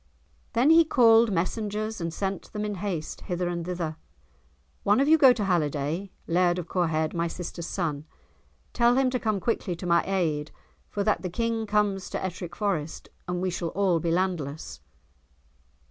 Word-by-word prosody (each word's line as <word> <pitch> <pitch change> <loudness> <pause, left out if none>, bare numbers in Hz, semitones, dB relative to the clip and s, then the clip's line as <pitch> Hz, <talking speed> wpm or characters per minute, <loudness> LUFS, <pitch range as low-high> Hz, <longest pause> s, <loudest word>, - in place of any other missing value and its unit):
Then 260 +7 +4
he 330 +1 +8
called 230 -6 +5
messengers 210 +3 -2
and 165 0 -2
sent 195 +3 -4
them 210 0 -2
in 210 - -2
haste 180 -7 -4
hither 180 0 -2
and 170 -1 -3
thither. 170 -3 -4 0.8
"One 205 +3 +3
of 275 - +3
you 315 - +7
go 275 -5 +7
to 235 -4 0
Halliday, 165 0 -1 0.2
Laird 175 +1 +2
of 180 -1 -4
Corehead, 160 -3 0
my 170 0 0
sister's 170 0 -6
son. 155 -5 -3 0.7
Tell 240 +1 +4
him 265 -1 +3
to 250 - 0
come 215 -4 0
quickly 190 -3 -1
to 175 - -8
my 170 -1 +3
aid, 160 -6 0 0.4
for 205 - -2
that 215 +1 +1
the 185 - -3
King 230 +3 -1
comes 205 -2 0
to - - -3
Ettrick 175 -2 -6
Forest, 175 -7 -2 0.2
and 180 0 -2
we 185 - 0
shall 170 -1 -3
all 190 -4 +3
be 170 - -1
landless." 165 -4 -2
185 Hz, 175 wpm, -27 LUFS, 170-215 Hz, 0.8 s, he